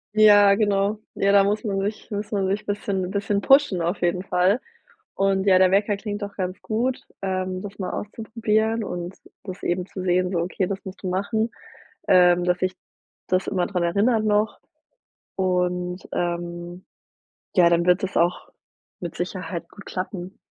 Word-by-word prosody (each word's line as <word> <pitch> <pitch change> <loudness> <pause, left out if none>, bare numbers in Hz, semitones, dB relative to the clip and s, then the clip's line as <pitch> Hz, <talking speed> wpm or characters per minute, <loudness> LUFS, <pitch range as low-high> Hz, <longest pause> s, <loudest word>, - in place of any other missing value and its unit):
Ja, 205 -2 +7
genau. 205 0 +1 0.2
Ja, 200 - +2
da 200 0 +6
muss 205 +3 0
man 200 -3 -1
sich 210 +3 -4
muss 205 0 -4
man 195 -3 0
sich 205 +2 -2
bisschen 200 -2 -2
bisschen 200 0 -1
pushen 270 -8 +4
auf 170 +4 -1
jeden 175 +1 +1
Fall. 185 +5 +2 0.5
Und 195 0 +1
ja, 185 -1 +6
der 185 -1 +5
Wecker 200 +1 +2
klingt 205 0 -5
doch 200 0 -6
ganz 185 -1 -4
gut, 245 +4 -1 0.2
ähm, 185 -1 -2
das 205 0 -9
mal 185 -2 -3
auszuprobieren 220 +1 -1
und 175 -1 -5 0.3
das 190 -1 -8
eben 180 +1 -1
zu 185 - -7
sehen, 180 0 +1
so 180 - -1
okay, 180 +2 -1
das 195 +1 -5
musst 190 +1 -9
du - - -2
machen, 220 +5 -1 0.6
ähm, 180 -1 +5
dass 180 0 +1
dich 185 0 -1 0.5
das 185 +1 +1
immer 185 -3 0
daran 180 -3 -1
erinnert 215 +6 +2
noch 210 +1 +1 0.8
und, 180 -1 -1
ähm, 175 +1 -4 0.7
ja, 175 -2 +6
dann 170 0 +2
wird 180 +1 +4
das 190 - -4
auch 175 +1 +1 0.5
mit 170 -2 -6
Sicherheit 180 -1 -4
gut 205 - -14
klappen. 185 0 -5
190 Hz, 170 wpm, -24 LUFS, 180-205 Hz, 0.8 s, Ja